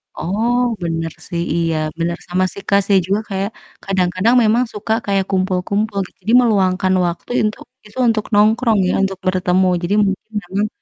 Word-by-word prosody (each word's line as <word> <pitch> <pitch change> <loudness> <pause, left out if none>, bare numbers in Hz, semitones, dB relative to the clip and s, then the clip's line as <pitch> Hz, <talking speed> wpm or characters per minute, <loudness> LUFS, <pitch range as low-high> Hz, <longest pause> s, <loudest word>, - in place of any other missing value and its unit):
Oh, 220 +8 0 0.2
bener 165 -1 -2 0.2
sih 170 -1 -3
iya, 165 -1 0 0.2
bener, 170 +1 -1
sama 180 +1 0
sih 200 - -9
Kak, 200 0 +5
saya 200 -1 +4
juga 200 +2 +1
kayak, 195 +1 -2 0.3
kadang-kadang 190 +4 +1
memang 225 +3 +3
suka 215 +1 -2
kayak 195 -1 +1
kumpul-kumpul 195 +2 -1
gitu, - - -27
jadi 225 - 0
meluangkan 190 -5 +2
waktu 170 +7 -4
intu 215 0 -1 0.3
itu 210 +3 -16
untuk 220 -2 +1
nongkrong 220 +1 +3
ya, - - +1
untuk 195 -1 -1
bertemu. 185 0 +2 0.2
Jadi 185 +4 0
mungkin 195 +3 -4
memang, 195 +4 -1
195 Hz, 165 wpm, -18 LUFS, 185-215 Hz, 0.3 s, Kak